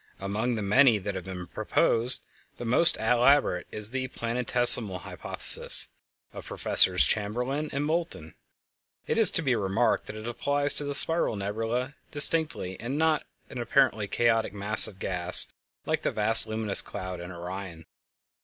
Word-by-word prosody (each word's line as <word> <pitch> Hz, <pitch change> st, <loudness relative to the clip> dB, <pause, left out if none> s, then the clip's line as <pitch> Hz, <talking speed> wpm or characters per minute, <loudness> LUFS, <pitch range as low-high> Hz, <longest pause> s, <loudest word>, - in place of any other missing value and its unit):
Among 105 Hz, +5 st, -4 dB
the 105 Hz, -, -5 dB
many 115 Hz, +3 st, +3 dB
that 100 Hz, 0 st, -6 dB
have 95 Hz, -2 st, -8 dB
been 90 Hz, -1 st, -8 dB
proposed 115 Hz, +7 st, -1 dB, 0.3 s
the 120 Hz, -, -8 dB
most 125 Hz, +9 st, +2 dB
elaborate 120 Hz, -4 st, 0 dB
is 105 Hz, +1 st, -1 dB
the 130 Hz, 0 st, -4 dB
"Planetesimal 120 Hz, -5 st, +4 dB
Hypothesis" -, -, 0 dB, 0.4 s
of -, -, -11 dB
Professors 90 Hz, -1 st, +4 dB
Chamberlin 125 Hz, +8 st, -3 dB
and 140 Hz, +2 st, -4 dB
Moulton. 160 Hz, -, -5 dB, 0.7 s
It -, -, -2 dB
is 220 Hz, -5 st, +8 dB
to 165 Hz, -, 0 dB
be 130 Hz, -4 st, 0 dB
remarked 100 Hz, +3 st, -2 dB
that 105 Hz, -, -9 dB
it 110 Hz, 0 st, -10 dB
applies 145 Hz, +4 st, -2 dB
to 145 Hz, -, 0 dB
the 145 Hz, 0 st, -2 dB
spiral 165 Hz, -7 st, +4 dB
nebulæ 115 Hz, +6 st, -5 dB, 0.2 s
distinctively, 150 Hz, -, 0 dB
and 125 Hz, +5 st, -6 dB
not 160 Hz, -1 st, -1 dB, 0.2 s
to -, -, -21 dB
an 125 Hz, -, -7 dB
apparently 120 Hz, -4 st, 0 dB
chaotic 115 Hz, 0 st, -1 dB
mass 105 Hz, +2 st, +3 dB
of 95 Hz, -, -14 dB
gas 90 Hz, -1 st, -1 dB, 0.4 s
like -, -, -3 dB
the -, -, -2 dB
vast 110 Hz, +1 st, +4 dB
luminous 110 Hz, -2 st, +2 dB
cloud 95 Hz, -3 st, -9 dB
in 90 Hz, +1 st, -10 dB
Orion. 90 Hz, -1 st, -9 dB
115 Hz, 155 wpm, -25 LUFS, 100-135 Hz, 0.7 s, is